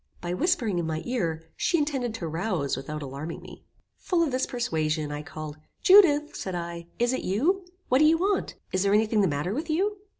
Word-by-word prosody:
By 175 0 -3
whispering 225 - +1
in 165 - -2
my 160 0 -3
ear, 170 -10 -1
she 345 - +1
intended 270 -7 -1
to 175 -7 -4
rouse 165 -3 -1
without 150 +3 -5
alarming 140 +4 -6
me. - - -13 0.3
Full 350 -3 +1
of 310 - 0
this 255 +1 0
persuasion, 155 -10 -1
I 145 0 -4
called; 155 -1 -8 0.3
"Judith," 325 -7 +6
said 190 -2 -4
I, 170 -1 -5
"is 240 +1 +2
it - - -1
you? 345 - 0 0.2
What 255 - +3
do 305 - +6
you 320 +1 +5
want? 390 +3 0 0.2
Is 185 - +1
there 200 +1 +3
any 220 +1 +4
thing 215 -1 +2
the 195 - +3
matter 150 +5 -1
with 310 +7 -4
you?" 395 +6 +1
205 Hz, 210 wpm, -27 LUFS, -, 0.3 s, Judith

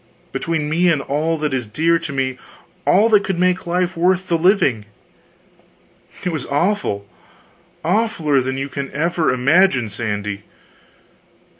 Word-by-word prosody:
between 160 -3 -2
me 170 +4 +2
and 155 - +1
all 155 +3 -1
that 150 -2 -2
is 125 -4 -2
dear 165 +10 +1
to 160 - -6
me, 130 -2 -2 0.5
all 205 +4 +5
that 210 -3 +4
could 190 -3 -2
make 180 +1 +1
life 180 +1 0
worth 180 +2 +1
the 170 - +2
living! 160 - +2 1.4
It 180 - 0
was 155 -5 -4
awful 145 - 0 0.8
awfuler 170 - +1
than 130 +1 -3
you 135 0 -3
can 140 0 -5
ever 165 +2 +1
imagine, 130 - +3
Sandy. 105 -2 -4
160 Hz, 140 wpm, -19 LUFS, 130-180 Hz, 1.4 s, all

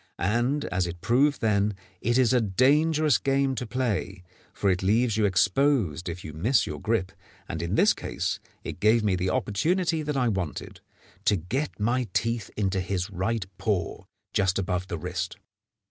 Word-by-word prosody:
And, 120 +9 0
as 90 -1 -1
it 85 0 -6
proved 135 - +2
then, 105 -2 +2 0.3
it 120 +3 +1
is 130 -1 +4
a 125 - +4
dangerous 145 - +3
game 135 0 +1
to 125 -2 -4
play, 110 -6 -2 0.3
for 100 - +1
it 90 - -1
leaves 110 +4 +2
you 110 -1 +2
exposed 95 - +2
if 85 +1 -7
you 75 - -7
miss 110 - +2
your - - -5
grip, 105 -5 0 0.4
and - - -4
in - - -1
this - - +5
case - - -3 0.2
it - - -6
gave 110 +3 +4
me 100 -3 +2
the 90 +1 -1
opportunity 165 - 0
that 150 -2 -2
I 125 -2 +2
wanted, 95 -8 -3 0.4
to 105 - +4
get 110 - -3
my 120 +3 +1
teeth 115 -3 -1
into 95 -2 0
his 95 +1 -3
right 100 +3 -1
paw 100 -6 -2 0.3
just 95 -2 +2
above 90 -1 -1
the 85 - -4
wrist. 90 +2 -4
105 Hz, 175 wpm, -26 LUFS, 95-130 Hz, 0.4 s, this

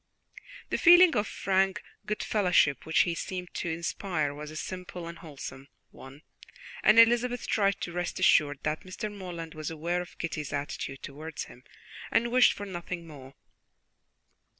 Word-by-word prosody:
The - - 0
feeling 350 -1 +8
of 210 0 +1
frank 195 +1 0 0.2
goodfellowship 180 - +2
which 160 -2 +4
he 170 - +1
seemed 180 +1 -5
to 175 - -3
inspire 165 -2 -2
was 150 +1 -8
a 155 - -10
simple 180 0 -6
and 170 0 -9
wholesome 140 -3 -9 0.2
one, 135 +4 -13 0.6
and 215 - +5
Elizabeth 240 +1 +5
tried 200 -2 +1
to 175 - -4
rest 175 0 -3
assured 145 -2 +4
that 150 +1 -1
Mr. 205 +3 -6
Morland 170 -4 -7
was 155 -1 -5
aware 170 +3 -2
of 180 - -11
Kitty's 155 -4 -4
attitude 140 -1 -4
towards 155 +3 -6
him 125 - -14 0.5
and 235 +1 +1
wished 250 0 +6
for 205 - -7
nothing 175 -2 -6
more. 140 -4 -12
175 Hz, 150 wpm, -29 LUFS, 155-200 Hz, 0.6 s, feeling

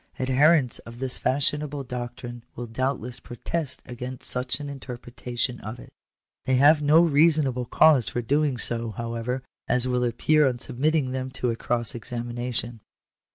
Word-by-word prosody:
Adherents 135 +1 +3
of 115 0 -12
this 130 0 -1
fashionable 145 +2 +1
doctrine 120 -1 -7
will 120 - -5
doubtless 125 +1 -2
protest 140 +4 -3
against 125 0 -5
such 125 +2 +1
an 145 - -6
interpretation 125 -2 -5
of 110 +3 -7
it - - -14 0.5
They 130 - +2
have 150 +4 +6
no 150 +3 +6
reasonable 150 -5 +3
cause 135 0 +4
for 120 - -3
doing 145 +1 +1
so, 115 -1 0
however, 115 +4 -4 0.2
as 125 0 +3
will 125 -1 0
appear 140 +5 +3
on 125 -2 -1
submitting 135 +2 +1
them 130 0 -3
to 125 -2 -1
a - - -2
cross 120 0 -1
examination. 120 0 -4
125 Hz, 150 wpm, -25 LUFS, 120-140 Hz, 0.5 s, have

